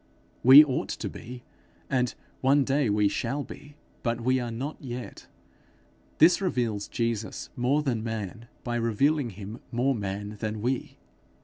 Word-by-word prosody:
We 135 +5 +10
ought 135 -3 -2
to - - -4
be, 125 +1 -9 0.4
and 125 -2 0 0.2
one 140 +2 +4
day 135 -2 +1
we 105 0 +3
shall 135 +7 -2
be, 145 +1 -12 0.3
but 115 -1 -1
we 130 +2 +2
are 120 -1 -3
not 130 +7 -4
yet. 125 -3 -7 0.9
This 175 +5 +6
reveals 120 - -1
Jesus 115 -2 -3
more 135 +5 +1
than 120 -6 -1
man, 115 0 -5 0.2
by 120 -1 -2
revealing 120 +5 +1
him 105 +3 -8
more 130 +3 +1
man 105 -1 -4
than 110 -1 -3
we. 125 +3 -2
120 Hz, 145 wpm, -27 LUFS, 110-135 Hz, 0.9 s, We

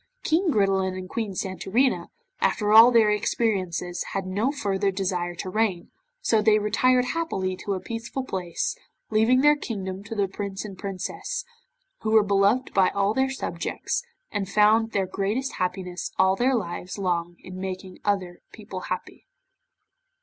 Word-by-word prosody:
King 335 +3 +2
Gridelin 195 -6 +1
and 185 0 -6
Queen 215 -1 -3
Santorina, 190 +8 0 0.3
after 210 -1 +1
all 225 +2 +10
their 225 -3 +5
experiences 190 -5 -1
had 195 -1 -2
no 205 +8 0
further 200 -8 0
desire 180 -2 -2
to 175 - -6
reign, 200 -5 0 0.3
so 220 - +3
they 215 0 +5
retired 250 +4 +3
happily 190 - -1
to 200 +1 -3
a - - -3
peaceful 230 +6 -5
place, 180 -8 -3 0.4
leaving 225 +4 +4
their 295 +1 +6
kingdom 195 -8 -5
to 225 +2 -6
the 200 -2 +1
Prince 195 +1 -5
and 200 -2 -7
Princess, 205 - -4 0.5
who 220 - -3
were 220 -1 +6
beloved 200 +5 +2
by 190 -1 +4
all 200 +1 +1
their 265 +1 +1
subjects, 265 - -3 0.3
and 195 -2 -2
found 215 +2 +4
their 195 -3 +1
greatest 205 +8 -2
happiness 180 0 -3
all 190 0 +4
their 255 +5 +2
lives 180 -3 -4
long 175 -3 -1
in 185 0 -8
making 185 -1 -6
other 185 -4 -1
people 205 -4 -8
happy. 185 - -5
200 Hz, 155 wpm, -25 LUFS, 185-225 Hz, 0.5 s, all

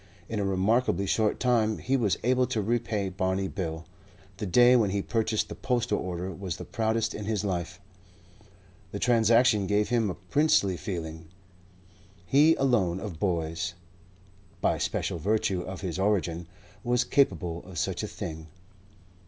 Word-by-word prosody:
In 110 - -3
a - - 0
remarkably 100 +1 +1
short 105 +2 +1
time 115 -4 +2
he 135 - -1
was 110 -7 +1
able 125 +1 +2
to 110 - -1
repay 110 -2 -1
Barney 95 +1 -1
Bill. 80 -4 -4 0.5
The 105 - -4
day 120 +7 +6
when 110 -5 +3
he 100 0 -1
purchased 110 -2 0
the - - -7
postal 125 -2 -1
order 90 +1 -4
was 90 -1 -5
the - - -7
proudest 110 0 -1
in 105 - -6
his 105 -1 -1
life. 90 -1 -3 1.1
The - - -4
transaction 115 -3 +3
gave 105 +1 +1
him 115 -3 +1
a 90 - -4
princely 100 - +2
feeling. 80 -3 -6 1.0
He 150 - +5
alone 100 -10 +1
of 95 -6 -7
boys, 85 0 -1 0.8
by - - +1
special 85 - -2
virtue 100 0 0
of 95 -1 -7
his 90 -1 -4
origin, 90 -4 0 0.4
was 120 0 +2
capable 90 - +1
of 90 -2 -11
such - - -1
a - - -3
thing. 80 0 -7
100 Hz, 155 wpm, -28 LUFS, 90-115 Hz, 1.1 s, day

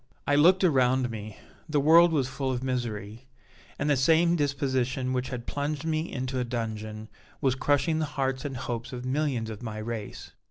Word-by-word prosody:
"I 145 - +1
looked 180 +7 +5
around 130 -6 +3
me 110 -2 -7 0.3
the 150 -1 +2
world 165 +4 +6
was 140 -5 +1
full 135 0 -2
of 125 0 -3
misery 120 -3 -4 0.5
and 145 - -1
the 145 - +4
same 165 +6 +4
disposition 135 -3 0
which 130 0 -1
had 120 -2 -5
plunged 145 +1 -3
me 160 +1 -1
into 130 0 -3
a - - +1
dungeon 110 -3 -4 0.3
was 135 -4 +2
crushing 145 +4 +1
the 155 - +1
hearts 135 -1 0
and 140 -3 -4
hopes 120 -1 -5
of 125 0 -6
millions 130 -4 -1
of 110 - -8
my 110 -3 -5
race. 110 -1 -6
130 Hz, 185 wpm, -27 LUFS, 120-145 Hz, 0.5 s, world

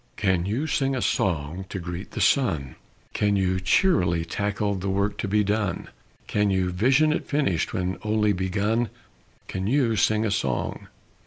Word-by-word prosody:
Can 95 -3 +1
you 120 +9 -1
sing 135 -3 0
a - - -1
song 85 +1 -1
to 100 - -4
greet 90 +1 -6
the - - -3
sun, 80 - +1 0.4
Can 105 -1 +1
you 95 -1 +1
cheerily 90 - +2
tackle 100 +3 -1
the 95 0 -3
work 100 +2 0
to - - -2
be 105 +2 +2
done, 105 -2 -1 0.4
Can 105 -1 +1
you 95 -2 +1
vision 130 +11 +3
it - - -3
finished 140 - 0
when 90 -1 -2
only 105 -1 +1
begun, 105 +5 0 0.6
Can 95 +1 -3
you 120 -2 +2
sing 110 +1 +2
a 105 - 0
song? 65 - -2
100 Hz, 165 wpm, -25 LUFS, 95-110 Hz, 0.6 s, vision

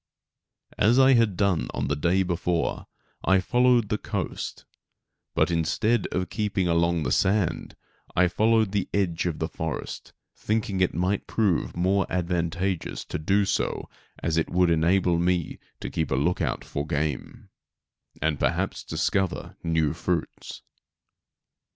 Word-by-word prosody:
As 110 +4 +4
I 135 0 +7
had 115 -6 +3
done 100 -5 +1 0.2
the 75 +2 0
day 85 +6 +2
before 85 -1 -1 0.4
I 95 0 +4
followed 120 +2 +3
the 105 -1 0
coast, - - -4 0.7
but - - +2
instead 90 +7 +1
of 90 0 -3
keeping 105 -4 0
along 85 -1 +2
the - - -1
sand 95 -4 +1 0.4
I 90 0 +5
followed 110 +3 +2
the 100 -2 -1
edge 90 -4 0
of 80 -3 -2
the 80 - -2
forest, 80 -1 -5 0.2
thinking 105 -3 -1
it 90 - +2
might 90 +4 0
prove 100 -7 0
more 95 +3 +2
advantageous 90 0 -2
to - - -4
do 100 +6 +2
so - - -2 0.3
as 80 -1 0
it 80 - +1
would 90 -1 +3
enable 85 +1 +3
me 90 -1 0 0.2
to - - -5
keep 80 -3 -1
a - - +1
look 75 +7 +1
out - - -2
for 70 +1 -4
game, 75 -3 -3 0.7
and 80 -2 0
perhaps - - -1
discover 95 -3 -1
new 80 -2 +1
fruits. 85 0 -4
90 Hz, 140 wpm, -26 LUFS, 85-100 Hz, 0.7 s, I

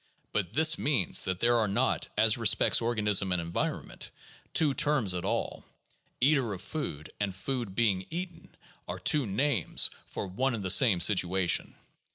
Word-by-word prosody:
But 100 -5 -2
this 160 +2 +4
means 130 - +2
that 95 0 -3
there 120 0 +3
are 110 - +1
not, 120 +7 -1
as 110 0 +4
respects 115 -1 +3
organism 105 -4 +1
and 90 - +1
environment, 85 0 -4 0.4
two 150 -3 +2
terms 145 - +1
at 90 -1 -3
all. - - -3 0.6
Eater 130 -4 +2
of 95 0 -9
food 85 - -6
and 100 -3 -3
food 120 -2 -5
being 100 -5 0
eaten 175 +1 -8 0.3
are 90 - -5
two 140 - +2
names 115 - 0 0.2
for - - -6
one 120 +7 -2
and 105 - -6
the 95 - 0
same 100 -5 +4
situation. 90 -1 +2
110 Hz, 160 wpm, -28 LUFS, 95-135 Hz, 0.6 s, this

